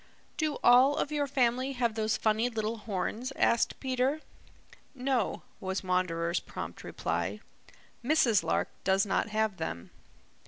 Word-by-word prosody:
"Do 310 -3 -1
all 255 +4 +7
of 290 - -1
your 290 -1 0
family 255 0 +1
have 240 -3 0
those 220 0 0
funny 220 +2 +1
little 225 -1 -2
horns?" 215 +4 -3
asked 235 - +2
Peter. 260 +3 0 0.7
"No," 255 -4 -1 0.2
was 190 +1 -3
Wanderer's 175 -2 0
prompt - - -7
reply. 85 +5 -2 0.6
"Mrs. 240 -7 +4
Lark - - 0
does 195 +1 +3
not 200 - 0
have 215 -2 0
them." 85 - -5
225 Hz, 130 wpm, -30 LUFS, 190-255 Hz, 0.7 s, all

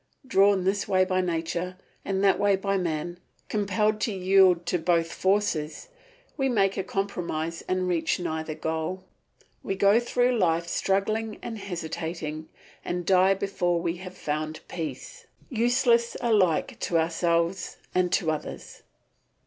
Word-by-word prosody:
Drawn 200 -4 +4
this 195 +2 0
way 185 -1 +3
by 185 0 +1
nature 175 +1 -2 0.3
and 195 0 -1
that 195 -2 +4
way 200 -1 +4
by 195 +1 -1
man, 175 -1 -2 0.3
compelled 210 +1 0
to 225 - 0
yield 185 -2 +4
to 175 +1 0
both 165 0 +1
forces, 190 - 0 0.5
we 270 -2 +1
make 195 -5 +2
a 190 - -2
compromise 170 -4 -3
and 185 0 0
reach 165 -2 0
neither 160 -2 -3
goal. 160 +4 -3 0.6
We 195 - -3
go 200 +3 +5
through 245 0 +1
life, 170 -2 +2
struggling 215 +4 0
and 225 -2 -5
hesitating, 160 -4 -5 0.3
and 175 0 -3
die 190 +1 +5
before 180 -3 0
we 170 0 -2
have 185 0 -9
found 155 +1 -3
peace, 470 - -6 0.2
useless 240 0 +2
alike 200 -9 +2
to 170 - 0
ourselves 170 +2 0 0.2
and 180 -1 +2
to 160 -4 +2
others. 155 - -6
185 Hz, 140 wpm, -26 LUFS, 170-200 Hz, 0.6 s, go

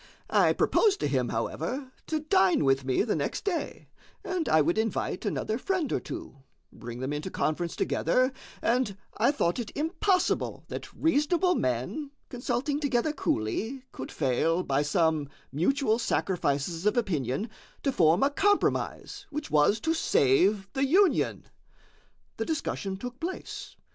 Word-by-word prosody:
I - - +5
proposed 415 -3 +3
to - - +1
him, 130 -4 0
however, 245 - -3 0.2
to 315 -1 -1
dine 190 - +3
with 135 0 +3
me 130 -1 +1
the - - 0
next 145 - -2
day, 370 -5 -3 0.4
and 360 -3 -1
I 155 - +5
would 170 +7 +2
invite 220 -1 -1
another 220 +3 -1
friend 370 -3 -1
or - - +1
two, - - -8 0.4
bring 120 +1 -8
them 135 +3 -2
into 150 +5 -3
conference 170 0 -1
together, 255 - +1 0.3
and 235 -4 +1 0.2
I 225 - +4
thought 255 - 0
it 230 - -4
impossible 360 +4 0
that - - -6
reasonable 330 +3 +2
men, 130 - -1 0.2
consulting 250 +4 -1
together 285 0 +1
coolly, 225 - -2
could 130 - -7
fail, 160 +6 +1
by 140 -2 +1
some 155 -1 +1 0.2
mutual 220 - +1
sacrifices 170 - 0
of 210 - +2
opinion, 160 - 0 0.4
to 275 - +2
form 170 -3 +4
a 280 - +3
compromise 410 +7 0
which 300 0 -5
was 155 +9 +4
to 325 - +1
save 195 - +3
the 270 +1 +1
Union. 380 +6 +3 0.9
The - - -2
discussion 200 - -2
took 245 +4 -7
place. 360 +3 -6
215 Hz, 145 wpm, -28 LUFS, -, 0.9 s, I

